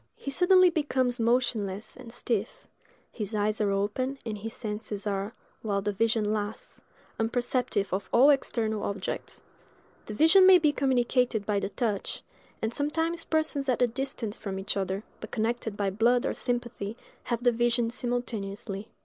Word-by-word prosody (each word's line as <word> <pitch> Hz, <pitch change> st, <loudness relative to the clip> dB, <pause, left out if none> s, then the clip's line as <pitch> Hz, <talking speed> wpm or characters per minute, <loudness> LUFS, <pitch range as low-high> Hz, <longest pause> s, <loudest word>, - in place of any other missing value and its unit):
He 275 Hz, -, -6 dB
suddenly 365 Hz, +3 st, +5 dB
becomes 260 Hz, -6 st, 0 dB
motionless 225 Hz, -4 st, 0 dB
and 250 Hz, -3 st, -11 dB
stiff: 230 Hz, -2 st, -3 dB, 0.5 s
his 215 Hz, -1 st, -4 dB
eyes 210 Hz, +1 st, 0 dB
are 205 Hz, -, +2 dB
open, 210 Hz, +7 st, -1 dB
and 220 Hz, -2 st, -3 dB
his 215 Hz, +2 st, -6 dB
senses 210 Hz, -2 st, -4 dB
are, 200 Hz, +2 st, -2 dB, 0.3 s
while 200 Hz, -2 st, -1 dB
the 205 Hz, -, 0 dB
vision 220 Hz, 0 st, +1 dB
lasts, 210 Hz, 0 st, -4 dB, 0.4 s
unperceptive 240 Hz, -3 st, 0 dB
of 195 Hz, +1 st, -2 dB
all 270 Hz, +5 st, +7 dB
external 220 Hz, -6 st, 0 dB
objects; 200 Hz, -2 st, -4 dB, 0.6 s
the 215 Hz, -, -5 dB
vision 345 Hz, -, +7 dB
may 375 Hz, -1 st, +9 dB
be 310 Hz, -4 st, +3 dB
communicated 250 Hz, -5 st, +1 dB
by 205 Hz, -1 st, +1 dB
the 200 Hz, -, -3 dB
touch, 210 Hz, -3 st, -2 dB, 0.4 s
and 220 Hz, +1 st, -1 dB
sometimes 325 Hz, +4 st, -1 dB
persons 310 Hz, -3 st, 0 dB
at 250 Hz, 0 st, +2 dB
a -, -, +7 dB
distance 240 Hz, -3 st, -4 dB
from 195 Hz, -2 st, -4 dB
each 195 Hz, +2 st, -2 dB
other, 195 Hz, +1 st, -2 dB, 0.2 s
but 220 Hz, -, -8 dB
connected 225 Hz, -1 st, -2 dB
by 200 Hz, -1 st, 0 dB
blood 235 Hz, +5 st, +3 dB
or -, -, 0 dB
sympathy, 240 Hz, -3 st, -3 dB, 0.3 s
have 235 Hz, -1 st, -2 dB
the 245 Hz, -, +5 dB
vision 235 Hz, 0 st, +1 dB
simultaneously. 220 Hz, -4 st, -3 dB
230 Hz, 160 wpm, -28 LUFS, 205-255 Hz, 0.6 s, may